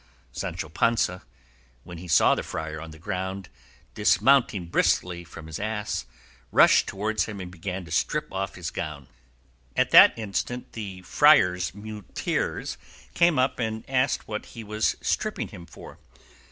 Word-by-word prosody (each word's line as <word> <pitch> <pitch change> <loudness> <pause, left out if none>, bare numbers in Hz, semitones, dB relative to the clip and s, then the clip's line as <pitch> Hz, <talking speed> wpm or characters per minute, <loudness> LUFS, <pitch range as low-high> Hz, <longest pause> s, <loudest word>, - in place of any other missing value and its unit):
Sancho - - -4
Panza, 90 +2 +1 0.6
when 85 -1 -9
he 90 - -9
saw 80 - +5
the - - -1
friar 80 0 -5
on 80 - -8
the 80 - -12
ground, 95 +1 -4 0.4
dismounting 125 -9 +3
briskly 85 +1 +1
from 80 -1 -11
his 80 -1 -6
ass, 105 - -3 0.4
rushed - - +6
towards 110 +2 -1
him 105 -2 -7
and 90 -1 -7
began 90 +1 -5
to - - -13
strip - - -1
off 95 0 -3
his 85 -3 -5
gown. 75 -4 -5 0.7
At - - +2
that - - +9
instant 120 +4 -4
the 95 -5 -7
friars' 90 - +4
muleteers 105 -1 -4 0.3
came 170 -2 +3
up 130 +1 +1
and 110 -1 -3
asked 130 0 0
what 105 -1 -5
he 115 - -6
was 105 +1 0
stripping - - -1
him 85 -1 -11
for. - - -13
95 Hz, 150 wpm, -26 LUFS, 85-110 Hz, 0.7 s, that